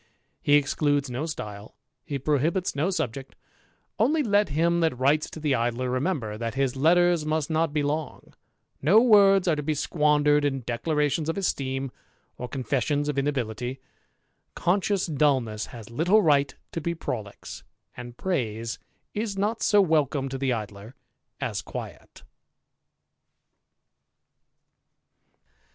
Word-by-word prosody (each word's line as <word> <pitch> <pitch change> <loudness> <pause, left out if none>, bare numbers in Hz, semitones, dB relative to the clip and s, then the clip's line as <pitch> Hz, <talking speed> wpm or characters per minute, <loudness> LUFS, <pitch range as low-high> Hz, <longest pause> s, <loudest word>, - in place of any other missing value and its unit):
He 145 - +4
excludes 145 -1 +1
no 135 +7 -3
style, 105 -8 -7 0.3
he 145 -4 -4
prohibits 155 +7 0
no 145 +5 +1
jct; 140 - -3 0.7
only 295 +8 +3
let 205 - +2
him 170 +4 +1
that 160 -7 +1
writes 140 +4 +2
to - - -9
the 150 -3 0
Idler 120 +1 -1
remember, 130 - -1 0.2
his 135 -1 0
letters 175 +3 +3
must 155 0 -1
not 160 0 +1
be 150 -1 0
long; 150 0 -4 0.5
no 185 +10 +6
words 200 -5 +5
are 165 - +3
to 150 - -3
be 155 +1 -1
ndered 150 -1 +2
in 135 -2 0
declarations 150 +5 0
of 165 - -2
esteem, 135 -8 -2 0.4
or 125 - -6
confessions 145 +3 -1
of 145 - -1
ility; 125 -3 -2 0.8
conscious 195 +2 +1
dulness 135 -9 0
has 115 -2 -11
little 180 - +3
right 140 -3 +3 0.2
to 165 - -4
be 170 +2 -2
prolix, 110 -10 -6 0.5
praise 115 - -2 0.3
is 210 -2 -3
not 210 +4 -1
so 205 -2 +5
welcome 150 -6 +1
to 135 0 -5
the 135 -1 0
Idler 105 +1 -5 0.4
as - - -2
quiet. - - -9
145 Hz, 130 wpm, -26 LUFS, 130-170 Hz, 0.8 s, no